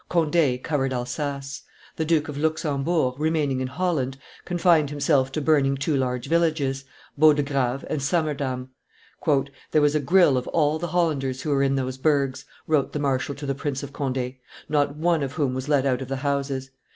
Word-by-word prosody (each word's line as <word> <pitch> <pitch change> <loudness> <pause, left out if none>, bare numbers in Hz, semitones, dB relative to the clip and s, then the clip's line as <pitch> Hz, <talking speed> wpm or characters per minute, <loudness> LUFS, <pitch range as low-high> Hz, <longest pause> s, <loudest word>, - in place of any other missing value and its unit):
Conde 160 -6 +2
covered 135 -4 0
Alsace; 135 +2 -4 0.3
the 160 - -1
Duke 160 -1 +2
of 150 - -6
Luxembourg, 150 -2 0
remaining 150 -4 0
in 130 - -1
Holland, 140 -3 -1 0.3
confined 170 -4 +3
himself 140 -2 +1
to 155 - -1
burning 140 -2 +3
two 145 +2 0
large 125 -2 -1
villages 155 -5 +1 0.3
Bodegrave 140 -4 +3
and 150 - -2
Saammerdam. 140 -4 -1 1.0
"There 155 - +4
was 145 0 +3
a 155 - +2
grill 145 -1 +4
of 125 - -9
all 155 -1 +1
the 175 - -3
Hollanders 145 -7 0
who 150 - -1
were 140 -1 +2
in 135 0 +2
those 130 -1 -3
burghs," 140 -3 +1 0.2
wrote 150 -3 +1
the 150 - -2
marshal 140 0 -1
to 145 +2 -7
the 135 - 0
Prince 140 -1 -3
of 140 -1 -8
Conde, 130 -2 -3 0.3
"not 145 -1 +1
one 165 +1 +1
of 135 -1 -3
whom 140 -4 0
was 130 +2 -4
let 140 -2 +3
out 130 -1 +1
of 130 - -5
the 135 - -2
houses. 135 -1 -2
140 Hz, 180 wpm, -24 LUFS, 135-155 Hz, 1.0 s, There